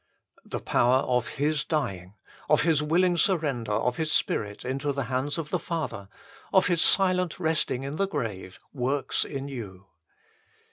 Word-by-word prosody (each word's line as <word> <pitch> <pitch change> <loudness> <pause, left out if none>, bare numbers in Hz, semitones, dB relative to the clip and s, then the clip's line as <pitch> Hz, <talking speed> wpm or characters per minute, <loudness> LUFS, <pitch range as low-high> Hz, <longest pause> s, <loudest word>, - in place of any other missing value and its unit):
The - - -5
power 125 +2 +3
of 125 -2 0
His 150 +1 +1
dying, 100 - -3 0.3
of 150 - +4
His 160 -3 +3
willing 175 +3 +2
surrender 145 - +1
of 125 +3 0
His 155 -1 -1
spirit 105 -6 0
into 135 +3 -1
the 140 0 -2
hands 135 +4 -1
of 160 -2 -4
the - - 0
Father, 155 - -4 0.4
of 190 -1 +5
His 175 -2 +2
silent 185 -3 +3
resting 155 -6 0
in 140 +3 -4
the 195 - +1
grave, 105 - -4 0.2
works 135 +1 0
in 135 -1 -5
you. 100 -8 -8
140 Hz, 155 wpm, -27 LUFS, 125-160 Hz, 0.4 s, of